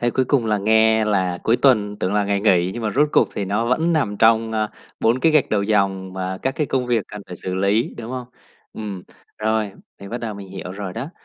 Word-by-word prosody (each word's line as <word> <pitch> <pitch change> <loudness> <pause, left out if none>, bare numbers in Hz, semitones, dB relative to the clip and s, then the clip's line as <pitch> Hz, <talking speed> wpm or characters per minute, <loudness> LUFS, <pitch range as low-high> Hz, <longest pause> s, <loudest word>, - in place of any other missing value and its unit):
Thế 120 0 +1
cuối 130 - +1
cùng 125 -4 +1
là 105 -1 +1
nghe 110 +1 +4
là 95 -4 0
cuối 115 +2 +3
tuần 105 -6 +3
tưởng 95 +3 -1
là 105 -1 +2
ngày 100 0 0
nghỉ, 90 -4 +3
nhưng 120 - -5
mà 110 - 0
rốt 145 +6 +2
cuộc - - +4
thì 100 - -2
nó 105 +4 -1
vẫn 160 +7 +1
nằm 115 -10 0
trong, 110 0 +3
ơ, 110 -1 -1 0.3
4 115 +3 +3
cái 160 +4 +3
gạch 155 -3 +3
đầu 100 -2 +2
dòng, 95 -3 0
và 95 0 -4
các 130 +5 -1
cái 150 - 0
công 130 -2 -1
việc 115 -4 +1
cần 105 -1 -8
phải 90 - -8
xử 90 +1 -3
lý, 100 +4 +1
đúng 115 +1 -6
không? 125 -1 -5 0.5
Ừm, 100 -4 -6 0.4
rồi, 110 -2 0 0.3
mình 100 +1 -9
bắt 120 - -3
đầu 110 -3 -5
mình 100 -1 -9
hiểu 95 -1 -7
rồi 95 -2 -6
đó. 130 +8 -5
110 Hz, 250 wpm, -21 LUFS, 100-120 Hz, 0.5 s, nghe